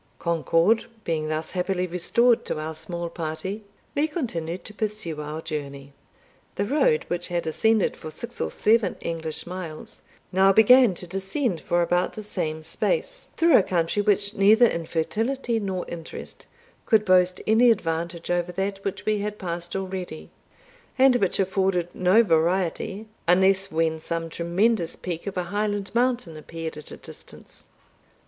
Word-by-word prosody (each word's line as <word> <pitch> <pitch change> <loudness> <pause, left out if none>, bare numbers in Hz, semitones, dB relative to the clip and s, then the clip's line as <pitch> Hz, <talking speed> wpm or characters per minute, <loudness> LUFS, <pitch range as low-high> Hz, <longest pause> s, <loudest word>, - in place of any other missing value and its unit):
Concord 170 +6 +2 0.2
being 155 -2 -1
thus 155 +1 -3
happily 185 0 -1
restored 225 +7 +2
to - - -3
our 155 +1 -4
small 170 +2 -4
party, 170 +5 -5 0.3
we 295 +2 +1
continued 180 - -4
to 210 - -9
pursue 210 -8 -3
our 155 +2 -6
journey. 140 -3 -6 0.6
The 200 - -1
road, 460 - +2
which 175 0 -2
had 175 -1 -2
ascended 220 +6 +2
for 155 - -8
six 235 +9 -7
or - - 0
seven 225 -1 +2
English 160 -2 -2
miles, 175 -3 -8 0.3
began 215 +7 +6
now - - -3
to 180 - -5
descend 195 - -2
for 175 0 +1
about 175 +1 0
the 215 - -7
same 160 -6 -2
space, - - -1
through 335 0 +5
a - - +8
country 175 +2 0
which 205 0 +2
neither 215 +5 +6
in 170 -7 -1
fertility 225 +8 -1
nor 190 -3 -3
interest 165 -1 -8 0.4
could 215 -2 +4
boast 185 -1 +4
any 225 +3 +5
advantage 170 -4 -1
over 175 0 0
that 195 +2 -3
which 195 0 -4
we 215 -1 +1
had 210 +1 -4
passed 175 -2 -4
already, 185 -4 -5 0.7
and 260 -1 +6
which 195 -5 +1
afforded 190 -2 +1
no 185 +5 +4
variety, 180 +3 0 0.2
unless 190 +2 +4
when 160 0 0
some 165 +1 -3
tremendous 175 +3 0
peak 175 +1 -6
of 195 - -4
a 180 - 0
Highland 205 -1 -1
mountain 240 -9 0
appeared 165 +1 -6
at 150 0 -8
a - - -7
distance. - - -13
185 Hz, 155 wpm, -25 LUFS, 165-215 Hz, 0.7 s, a